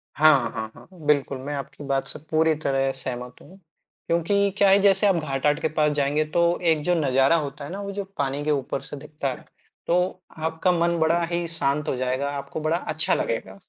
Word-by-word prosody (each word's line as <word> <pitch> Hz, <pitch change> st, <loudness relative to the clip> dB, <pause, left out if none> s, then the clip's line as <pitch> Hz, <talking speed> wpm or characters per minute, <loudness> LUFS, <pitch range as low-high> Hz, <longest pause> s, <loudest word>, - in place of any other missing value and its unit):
हाँ, 155 Hz, -2 st, +5 dB
हाँ, 110 Hz, -2 st, -5 dB
हाँ, -, -, -15 dB, 0.2 s
बिल्कुल, 140 Hz, -2 st, +2 dB
मैं 140 Hz, +3 st, -5 dB
आपकी 140 Hz, +1 st, -7 dB
बात 135 Hz, -1 st, -1 dB
से -, -, -4 dB
पूरी 160 Hz, 0 st, +3 dB
तरह 135 Hz, -1 st, +1 dB
सहमत 125 Hz, -1 st, -5 dB
हूँ। 190 Hz, -, -15 dB, 0.5 s
क्योंकि 200 Hz, +4 st, +2 dB
क्या 200 Hz, -1 st, +5 dB
है 195 Hz, +1 st, +6 dB
जैसे 200 Hz, +1 st, +5 dB
आप 195 Hz, -, +4 dB
घाट-आट 150 Hz, -1 st, 0 dB
के -, -, +2 dB
पास 150 Hz, -1 st, +3 dB
जाएँगे 145 Hz, +2 st, +2 dB
तो 170 Hz, -, +4 dB, 0.3 s
एक 150 Hz, -2 st, 0 dB
जो 180 Hz, +1 st, +2 dB
नजारा 135 Hz, 0 st, +3 dB
होता 145 Hz, -2 st, -3 dB
है 150 Hz, -, -8 dB
ना, 200 Hz, +2 st, -5 dB
वो 200 Hz, 0 st, -5 dB
जो 200 Hz, 0 st, -4 dB
पानी 140 Hz, +1 st, -1 dB
के 155 Hz, -, +2 dB
ऊपर 135 Hz, -1 st, -1 dB
से 140 Hz, +1 st, -6 dB
दिखता 150 Hz, -1 st, -5 dB
है, -, -, -9 dB, 0.4 s
तो 180 Hz, +1 st, +1 dB, 0.2 s
आपका 160 Hz, +3 st, 0 dB
मन 170 Hz, 0 st, +1 dB
बड़ा 165 Hz, +2 st, +3 dB
ही 170 Hz, 0 st, -1 dB
शांत 150 Hz, -2 st, -1 dB
हो -, -, 0 dB
जाएगा, 130 Hz, +2 st, -1 dB
आपको 140 Hz, +2 st, -5 dB
बड़ा 160 Hz, +2 st, +1 dB
अच्छा 155 Hz, -2 st, 0 dB
लगेगा। 100 Hz, -4 st, -2 dB
150 Hz, 210 wpm, -24 LUFS, 135-170 Hz, 0.5 s, है